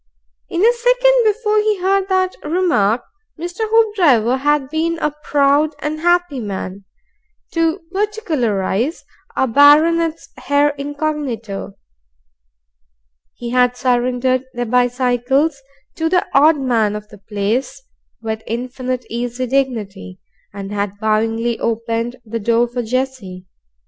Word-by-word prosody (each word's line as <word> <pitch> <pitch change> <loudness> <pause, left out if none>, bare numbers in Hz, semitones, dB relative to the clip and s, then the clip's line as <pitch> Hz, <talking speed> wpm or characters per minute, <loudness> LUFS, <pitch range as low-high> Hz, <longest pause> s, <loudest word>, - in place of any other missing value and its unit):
In 340 - -2
the 465 +3 +5
second - - +4
before 425 -1 0
he 425 -1 +1
heard 390 +1 +1
that 370 -1 +1
remark, 300 - +1 0.4
Mr. 350 +6 -4
Hoopdriver 350 - +3
had 290 0 +1
been 330 +1 0
a 300 -2 -1
proud 290 +1 +2
and 305 +1 -4
happy 350 -4 +1
man, 195 -2 -6 0.7
to 330 +2 0
particularize, 305 - -1 0.3
a 265 - +2
baronet's 315 +5 +4 0.2
heir 285 +1 +4
incognito. 280 -9 -4 1.6
He 235 -1 -6
had 250 0 +2
surrendered 255 +1 +1
their 245 0 -2
bicycles 250 +4 +1 0.4
to 325 0 0
the 360 +1 +2
odd 300 +3 +5
man 225 -6 +1
of 210 0 -7
the 210 - -14
place 210 - -2 0.4
with 220 0 -3
infinite 250 +1 -4
easy 245 +2 -3
dignity, 225 -8 -2 0.3
and 200 0 -7
had 205 -1 -3
bowingly 225 +2 0
opened 230 +1 -2
the 230 +1 -4
door 235 +2 +2
for 245 +1 -3
Jessie. 235 -6 -3
255 Hz, 120 wpm, -18 LUFS, 230-325 Hz, 1.6 s, the